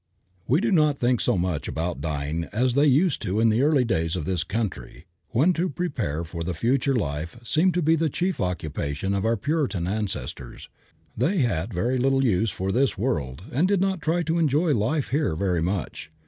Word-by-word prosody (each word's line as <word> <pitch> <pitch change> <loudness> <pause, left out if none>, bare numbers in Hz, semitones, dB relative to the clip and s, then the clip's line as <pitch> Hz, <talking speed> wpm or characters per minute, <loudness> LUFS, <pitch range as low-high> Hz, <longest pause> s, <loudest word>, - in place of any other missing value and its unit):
We 145 +9 +3
do 225 0 +1
not 150 -5 +3
think 125 -2 +1
so - - +1
much 90 -3 -1
about 80 -2 -3
dying 75 +2 -2
as 125 +6 0
they 145 +3 +4
used 145 +4 +3
to 100 -1 -1
in 115 0 +4
the 110 +3 +2
early 145 -3 +3
days 80 -7 0
of 80 -5 -3
this 90 -3 -1
country, 95 - -4 0.2
when 145 +11 +3
to 175 +2 -1
prepare 130 - -2
for 85 0 -7
the 85 +1 -3
future 130 - +1
life 80 -4 -3
seemed 165 +9 +2
to 180 - +1
be 160 +2 +4
the 160 0 +1
chief 180 +5 -2
occupation 80 0 -2
of 100 +1 -1
our 115 +1 +2
Puritan 140 - -1
ancestors. 95 - -4 0.5
They 165 - +1
had 105 -5 -1
very 120 +8 0
little 135 +1 +2
use 110 -1 +2
for 95 +1 -3
this 130 +1 +1
world 80 - -2
and 155 +9 +2
did 200 -1 +2
not 190 -2 0
try 165 +3 +1
to 165 +1 0
enjoy 155 +1 +2
life 125 +6 0
here 145 - 0
very 90 -1 0
much. 90 -2 -3
115 Hz, 200 wpm, -25 LUFS, 90-150 Hz, 0.5 s, they